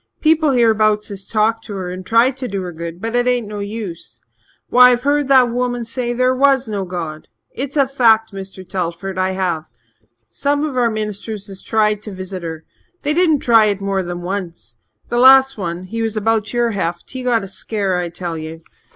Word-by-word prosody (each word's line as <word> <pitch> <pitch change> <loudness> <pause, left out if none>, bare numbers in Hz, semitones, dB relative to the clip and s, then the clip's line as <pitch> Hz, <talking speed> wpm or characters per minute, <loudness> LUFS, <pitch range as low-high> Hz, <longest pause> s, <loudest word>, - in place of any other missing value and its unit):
People 315 -1 +3
hereabouts 215 -3 +2
has 195 -1 -8
talked 225 +1 +1
to 210 - -6
her 185 -2 -4
and 185 +1 -7
tried 230 +5 +3
to 260 -1 -4
do 195 -3 -3
her 180 - -5
good, 170 +1 -7
but 225 +3 -3
it 245 0 +2
ain't 245 -3 +1
no 210 0 -6
use. 200 -5 -5 0.5
Why, 250 0 +7
I've 245 0 +1
heard 290 0 +1
that 260 -3 +5
woman 245 -1 -2
say 240 +1 -2
there 255 +1 +2
was 270 -1 +3
no 200 -3 -3
God. 165 -4 -6 0.3
It's 280 +2 -4
a 275 -2 +4
fact, 225 -5 +3
Mr. 190 -1 -9
Telford 185 +1 -4
I 185 0 +1
have. 175 -4 -1 0.6
Some 285 - -1
of 300 -4 -3
our 245 -2 +2
ministers 215 -1 -4
has 195 -1 -8
tried 210 -2 +1
to 210 - -8
visit 185 0 -6
her. 160 -1 -6 0.4
They 295 +1 +1
didn't 320 -4 +3
try 225 -2 +5
it 205 -2 0
more 195 -1 -1
than 175 -1 -5
once. 175 -10 -6 0.3
The 240 - 0
last 265 +1 +7
one 175 -3 -4
he 225 +5 -5
was 225 -1 -2
about 220 0 0
your 240 -1 +1
heft 175 -4 -3
he 260 - -5
got 240 -4 +1
a - - -6
scare, 195 -1 -2
I 175 -1 -2
tell 170 -1 -5
you. 160 +1 -8
215 Hz, 205 wpm, -18 LUFS, 185-245 Hz, 0.6 s, Why